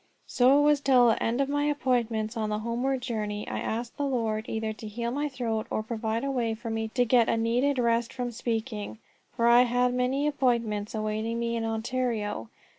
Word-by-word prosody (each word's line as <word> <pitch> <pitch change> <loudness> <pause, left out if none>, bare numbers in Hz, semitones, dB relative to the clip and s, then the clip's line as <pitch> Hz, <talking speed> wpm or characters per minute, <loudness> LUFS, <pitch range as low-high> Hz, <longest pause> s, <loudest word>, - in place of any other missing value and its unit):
So 260 +3 +4
it - - +5
was 295 -1 +4
till 255 -4 +5
the 225 - +1
end 235 +4 +1
of 275 - +1
my 290 +1 0
appointments. 240 -6 0
On 215 -2 -1
the 210 - -1
homeward 245 +4 -2
journey 210 -4 -3
I - - -3
asked 235 +2 -4
the 290 - -1
Lord 225 -4 -1
either 220 0 -2
to 215 0 -9
heal 235 +3 -3
my 290 +3 -1
throat, 230 -5 -3
or 215 - -2
to - - -26
provide 225 0 -2
a 275 - -1
way 235 -4 -1
for 230 0 -6
me 225 0 -2
to 245 -1 +3
get 235 -1 +4
a - - +2
needed 245 +5 +1
rest 235 -1 +1
from 245 -2 -4
speaking, 225 -2 -3 0.4
for 235 - +1
I 235 +1 +7
had 245 0 +2
many 255 +3 0
appointments 235 -7 0
awaiting 215 +2 -2
me 235 0 -1
in 225 -1 -2
Ontario. 225 - -2
235 Hz, 210 wpm, -27 LUFS, 220-250 Hz, 0.4 s, I